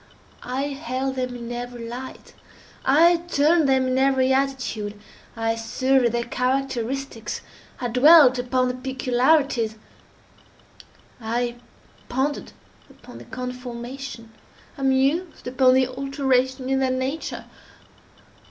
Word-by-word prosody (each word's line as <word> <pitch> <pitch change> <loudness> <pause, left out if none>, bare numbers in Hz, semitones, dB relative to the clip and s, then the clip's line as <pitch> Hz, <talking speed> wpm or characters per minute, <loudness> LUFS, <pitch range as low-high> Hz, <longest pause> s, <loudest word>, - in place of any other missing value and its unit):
I 255 +2 -3
held 265 -1 -3
them 255 -1 -3
in 235 0 -7
every 240 -1 -6
light. 250 +3 -8 0.5
I 335 +6 +5
turned 330 -2 +2
them 265 -1 +3
in 255 0 +1
every 265 -1 +3
attitude. 260 -6 -2 0.4
I 225 0 0
surveyed 245 +2 +1
their 235 0 -1
characteristics. 255 -1 -2 0.4
I 245 - -2
dwelt 260 +1 +7
upon 255 0 +1
their 250 - -4
peculiarities. 255 -2 +1 1.5
I 240 +2 -2 0.5
pondered 270 +4 -2 0.4
upon - - -14
their - - -13
conformation. 250 -1 -7 0.4
I 275 - -10
mused 275 +6 +1
upon 255 0 +4
the 260 0 +4
alteration 260 -1 0
in 270 0 +1
their 265 -1 +1
nature. 260 +4 -3
260 Hz, 110 wpm, -23 LUFS, 245-270 Hz, 1.5 s, dwelt